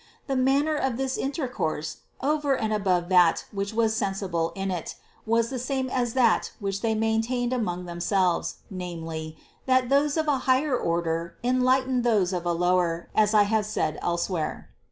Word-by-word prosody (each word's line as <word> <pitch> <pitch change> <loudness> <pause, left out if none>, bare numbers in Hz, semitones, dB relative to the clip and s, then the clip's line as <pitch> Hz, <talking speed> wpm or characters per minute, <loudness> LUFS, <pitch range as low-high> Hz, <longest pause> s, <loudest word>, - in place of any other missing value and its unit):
The 270 - -2
manner 275 +4 +2
of 265 -4 -1
this 265 0 -1
inter 275 0 -2
course, 160 -9 -3 0.2
over 290 -1 +1
and 220 -2 -1
above 185 -4 +1
that 180 -3 +4
which 200 0 -3
was 220 0 +1
sensible 195 -6 -1
in 195 0 -2
it, 175 -4 -4 0.3
was 230 +1 +2
the 260 - -3
same 260 +1 -2
as 245 -2 -1
that 240 -4 +3
which 195 -1 -3
they 225 -1 +1
maintained 225 +3 0
among 180 -7 -2
themselves, 175 +1 0 0.2
namely, 165 -4 -6 0.3
that 255 -1 +3
those 285 +2 +2
of 315 -1 0
a 280 -3 +2
higher 260 +1 +3
order 170 -3 -1
enlight 255 +1 +2
en 255 -1 +1
those 210 -6 +2
of 175 -1 -2
a - - +2
lower, 175 -1 +1
as 215 0 +3
I 210 - +7
have 210 0 0
said 155 -7 -1
elsewhere 170 -1 -2
(No. - - -34
215 Hz, 175 wpm, -26 LUFS, 175-255 Hz, 0.3 s, I